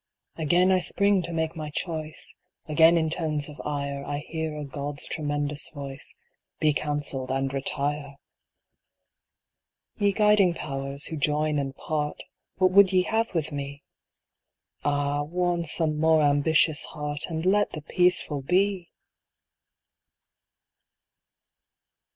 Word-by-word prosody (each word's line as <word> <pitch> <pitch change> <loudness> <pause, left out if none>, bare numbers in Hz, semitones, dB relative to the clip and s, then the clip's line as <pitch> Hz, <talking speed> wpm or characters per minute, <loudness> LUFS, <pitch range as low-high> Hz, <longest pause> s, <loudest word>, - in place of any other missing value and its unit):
Again 175 +4 +3
I 185 - +4
spring 200 +1 +2
to 170 0 -2
make 160 0 -2
my 155 -2 -5
choice; 155 0 -5 0.3
Again 160 +2 +5
in 160 -1 0
tones 155 -3 -1
of 150 -1 -9
ire 140 -1 -3
I 145 0 -3
hear 160 +1 -4
a 150 - -5
God's 140 +1 -4
tremendous 145 -1 -3
voice 140 -2 -9
— - - -50
" - - -56
Be 155 -1 +3
counsell'd, 145 -3 -2
and 135 +1 -1
retire! 140 +1 -2 0.9
" - - -57
Ye 205 -1 +3
guiding 210 -3 +4
Powers, 140 -1 -4
who 160 - -5
join 150 0 +1
and 135 -1 -4
part, 150 0 -3 0.3
What 185 -1 +3
would 195 0 +6
ye 185 -1 +4
have 225 0 -1
with 155 -1 -1
me? 140 0 -6 1.0
Ah, 145 0 0
warn 175 +2 -1
some 155 -1 +1
more 160 -1 +4
ambitious 145 +2 +3
heart. 150 0 -4
And 160 0 -3
let 205 +2 +2
the 155 - -6
peaceful 180 -4 +2
be 185 +4 +1
155 Hz, 135 wpm, -26 LUFS, 145-170 Hz, 1.0 s, would